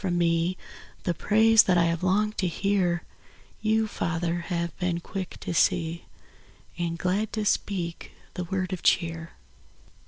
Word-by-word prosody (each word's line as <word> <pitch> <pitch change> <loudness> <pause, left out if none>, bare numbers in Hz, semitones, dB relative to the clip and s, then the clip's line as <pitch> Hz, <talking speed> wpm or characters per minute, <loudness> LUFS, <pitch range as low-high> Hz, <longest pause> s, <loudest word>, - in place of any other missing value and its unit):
from 180 -2 0
me 170 +1 +1 0.5
The 175 - 0
praise 220 +5 +5
that 180 -2 +2
I 170 - +5
have 170 -1 0
longed 210 +4 +1
to 185 - +2
hear, 175 -1 0 0.6
Y>u, 220 0 +2
Father, 170 -3 -2
have 170 -1 -2
been 180 -2 0
quick 190 +1 -6
to - - -3
see 165 0 +1 0.7
Ar^d 170 -1 -1
glad 190 +5 0
to 215 -2 -1
speak 180 -5 -1 0.2
the 180 - -4
word 185 +1 -2
of 180 - -4
cheer. 165 -1 +1
180 Hz, 150 wpm, -26 LUFS, 170-195 Hz, 0.7 s, praise